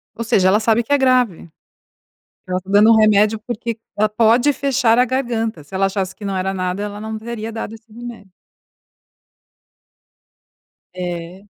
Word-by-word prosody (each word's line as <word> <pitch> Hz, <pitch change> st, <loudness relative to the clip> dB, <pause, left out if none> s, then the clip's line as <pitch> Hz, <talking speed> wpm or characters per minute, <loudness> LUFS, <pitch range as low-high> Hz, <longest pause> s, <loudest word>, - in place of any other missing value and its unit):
Ou 230 Hz, -, -4 dB
seja, 195 Hz, -3 st, +3 dB
sabe 225 Hz, +1 st, +2 dB
que 260 Hz, -, -1 dB
é -, -, +5 dB
grave. 250 Hz, -, +1 dB, 1.0 s
Ela 185 Hz, 0 st, -1 dB
está 190 Hz, +1 st, -11 dB
dando 205 Hz, +2 st, +6 dB
um -, -, +5 dB
remédio, 215 Hz, 0 st, +4 dB
porque 230 Hz, -1 st, -4 dB, 0.2 s
ela 215 Hz, +1 st, +2 dB
pode 230 Hz, +6 st, +3 dB
fechar 255 Hz, -4 st, +1 dB
a 250 Hz, -, +5 dB
garganta, 235 Hz, -, -2 dB
se 145 Hz, -, -15 dB
ela 195 Hz, +1 st, +2 dB
achasse 190 Hz, -1 st, -3 dB
que 210 Hz, -, -12 dB
não 195 Hz, -1 st, -2 dB
era 190 Hz, +1 st, -2 dB
nada 185 Hz, +1 st, -2 dB
ela 205 Hz, 0 st, -6 dB
não 220 Hz, 0 st, -5 dB
teria 225 Hz, 0 st, -6 dB
dado 225 Hz, -1 st, -6 dB
esse 225 Hz, 0 st, -17 dB
remédio. 235 Hz, -3 st, -10 dB, 2.7 s
É. 175 Hz, +1 st, -6 dB
215 Hz, 160 wpm, -19 LUFS, 195-235 Hz, 2.7 s, dando